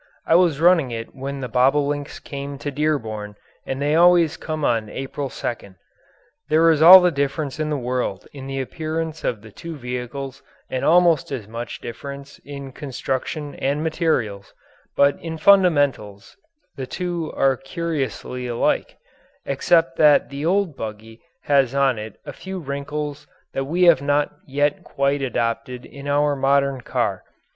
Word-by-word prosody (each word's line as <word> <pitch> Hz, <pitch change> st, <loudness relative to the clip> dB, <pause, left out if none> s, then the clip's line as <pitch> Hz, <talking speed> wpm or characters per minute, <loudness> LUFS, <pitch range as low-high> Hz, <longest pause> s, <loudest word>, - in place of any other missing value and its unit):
I -, -, +2 dB
was 170 Hz, -4 st, +4 dB
running 165 Hz, -5 st, +4 dB
it 115 Hz, -1 st, -6 dB
when 135 Hz, +1 st, -6 dB
the 125 Hz, -, -3 dB
bobolinks 140 Hz, +4 st, +1 dB
came 140 Hz, 0 st, -7 dB
to 145 Hz, +1 st, -5 dB
Dearborn 115 Hz, -9 st, -2 dB, 0.3 s
and 135 Hz, -, -3 dB
they 145 Hz, +1 st, +1 dB
always 170 Hz, -1 st, +5 dB
come 155 Hz, -2 st, -4 dB
on 115 Hz, -2 st, 0 dB
April 135 Hz, +3 st, -5 dB
2nd. 100 Hz, -6 st, -5 dB, 0.7 s
There 160 Hz, +2 st, +5 dB
is 155 Hz, -2 st, +1 dB
all 185 Hz, +3 st, +11 dB
the 180 Hz, 0 st, +3 dB
difference 140 Hz, 0 st, -2 dB
in 155 Hz, 0 st, -1 dB
the 150 Hz, -, -1 dB
world 125 Hz, -6 st, -3 dB
in 135 Hz, -2 st, -8 dB
the 135 Hz, 0 st, -3 dB
appearance 160 Hz, +2 st, -4 dB
of 110 Hz, -4 st, -2 dB
the 110 Hz, -, -12 dB
two 165 Hz, +9 st, -8 dB
vehicles 125 Hz, +1 st, -6 dB, 0.3 s
and 130 Hz, -, -2 dB
almost 170 Hz, -3 st, +4 dB
as 120 Hz, -7 st, -5 dB
much 115 Hz, +2 st, -7 dB
difference 140 Hz, +3 st, -8 dB
in 140 Hz, -1 st, -8 dB
construction 140 Hz, +2 st, -4 dB
and 145 Hz, +3 st, -1 dB
materials, 130 Hz, -, -1 dB, 0.4 s
but 140 Hz, 0 st, +4 dB
in 165 Hz, -1 st, -6 dB
fundamentals 145 Hz, -, +2 dB, 0.4 s
the 130 Hz, -1 st, -5 dB
two 175 Hz, 0 st, -3 dB
are 135 Hz, -1 st, +3 dB
curiously 135 Hz, -4 st, -4 dB
alike 120 Hz, -1 st, -1 dB, 0.5 s
except 140 Hz, +1 st, +2 dB
that 150 Hz, -2 st, +5 dB
the 140 Hz, +1 st, -5 dB
old 180 Hz, -2 st, +1 dB
buggy 110 Hz, 0 st, -8 dB, 0.2 s
has 140 Hz, -2 st, +2 dB
on 135 Hz, -4 st, +2 dB
it 110 Hz, -1 st, -8 dB
a -, -, -7 dB
few 190 Hz, 0 st, -7 dB
wrinkles 145 Hz, -1 st, -5 dB, 0.3 s
that 135 Hz, -, -2 dB
we 170 Hz, +6 st, 0 dB
have 170 Hz, -6 st, +6 dB
not 145 Hz, +1 st, +1 dB
yet 145 Hz, +1 st, 0 dB
quite 140 Hz, +1 st, 0 dB
adopted 120 Hz, 0 st, -2 dB
in 140 Hz, 0 st, -10 dB
our 145 Hz, 0 st, +2 dB
modern 140 Hz, -1 st, +1 dB
car. -, -, -2 dB
140 Hz, 155 wpm, -22 LUFS, 130-155 Hz, 0.7 s, all